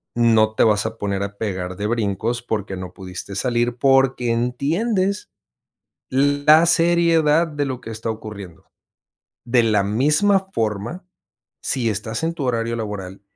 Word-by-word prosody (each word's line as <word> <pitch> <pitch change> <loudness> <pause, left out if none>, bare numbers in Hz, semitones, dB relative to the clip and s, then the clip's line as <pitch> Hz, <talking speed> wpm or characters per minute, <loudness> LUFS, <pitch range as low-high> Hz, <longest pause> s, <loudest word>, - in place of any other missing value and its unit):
no 110 -2 +3
te - - +3
vas 105 -2 +3
a 110 0 -4
poner 100 -2 -2
a 100 0 -6
pegar 95 -4 -4
de 105 - -2
brincos 115 +1 -1
porque 105 -5 -3
no 90 -1 -7
pudiste 95 +1 -7
salir 120 +2 0
porque 135 -2 +2
entiendes 180 - -1 0.8
la 145 +4 +4
seriedad 165 -1 +3
de 145 -2 -3
lo 130 -3 -4
que 115 - -9
está 115 +1 -4
ocurriendo. 105 -6 -9 0.8
De 120 0 +3
la 110 -3 +2
misma 150 - +2
forma, 110 - -3 0.6
si 125 -4 0
estás 110 +5 -3
en 165 +1 -1
tu 155 -5 -4
horario 115 -2 -1
laboral 100 -4 -6
115 Hz, 145 wpm, -21 LUFS, 105-145 Hz, 0.8 s, la